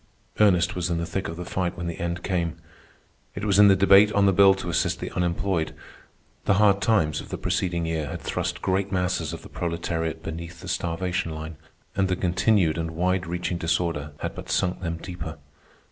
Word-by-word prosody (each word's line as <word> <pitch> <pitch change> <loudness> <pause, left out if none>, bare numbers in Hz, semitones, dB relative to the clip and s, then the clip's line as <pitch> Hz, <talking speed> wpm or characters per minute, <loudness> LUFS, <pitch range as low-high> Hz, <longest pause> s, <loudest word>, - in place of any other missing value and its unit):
Ernest 95 -5 +4
was 90 0 -1
in 85 - 0
the 85 - -2
thick 95 +3 -3
of 80 - -5
the 90 - -5
fight 90 -1 -2
when 85 - -4
the 85 -1 -4
end 85 0 -3
came. 85 -4 -1 0.8
It 100 - -4
was 100 -1 +3
in 105 - +9
the 95 - +6
debate 100 +2 +6
on 100 -1 +4
the 95 - +4
bill 95 +1 +6
to 95 -2 -7
assist - - 0
the - - -5
unemployed. 85 -1 -1 0.7
The 100 - +4
hard 100 -1 +4
times 95 -8 +2
of - - -12
the - - -4
preceding 85 -2 -1
year 80 -2 -2
had - - -5
thrust - - -3
great 95 +1 0
masses 90 -4 0
of 85 - -7
the - - -10
proletariat 80 -1 -3
beneath 85 +1 -7
the - - -9
starvation 90 0 -2
line, 80 +1 -6 0.4
and 95 -1 +2
the 90 - 0
continued 90 -1 +2
and 80 0 -3
wide 90 +1 0
reaching 85 0 -2
disorder 80 -3 -1
had - - -3
but - - -9
sunk 90 -1 0
them 85 -2 -3
deeper. 80 -2 -7
90 Hz, 205 wpm, -25 LUFS, 85-95 Hz, 0.8 s, in